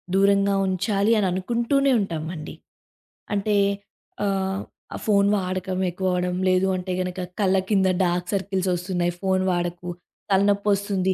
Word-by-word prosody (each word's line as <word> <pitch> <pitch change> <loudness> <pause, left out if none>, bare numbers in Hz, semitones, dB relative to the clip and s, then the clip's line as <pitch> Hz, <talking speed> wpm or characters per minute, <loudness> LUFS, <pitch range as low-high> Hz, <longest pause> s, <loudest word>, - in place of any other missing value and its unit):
దూరంగా 200 0 +3
ఉంచాలి 200 +3 +1
అని 200 -3 +2
అనుకుంటూనే 235 +8 +1
ఉంటామండి. 165 -3 -4 0.8
అంటే, 205 +1 +1 0.7
ఆహ్, 195 0 -1 0.3
ఆ - - -4
ఫోను 200 -2 +4
వాడకం 185 0 -3
ఎక్కువవడం. 180 0 -1
లేదు 185 +1 +3
అంటే 185 0 -4
గనక 180 0 -4 0.2
కళ్ళ 190 -1 +3
కింద 195 -2 +3 0.2
డార్క్ 175 0 -1
సర్కిల్స్ 190 -1 -1
ఒస్తున్నాయి. 175 -1 -1
ఫోను 190 -1 +1
వాడకు, 175 0 -2 0.4
తలనొప్పొస్తుంది 200 -1 +2
190 Hz, 120 wpm, -24 LUFS, 180-200 Hz, 0.8 s, ఫోను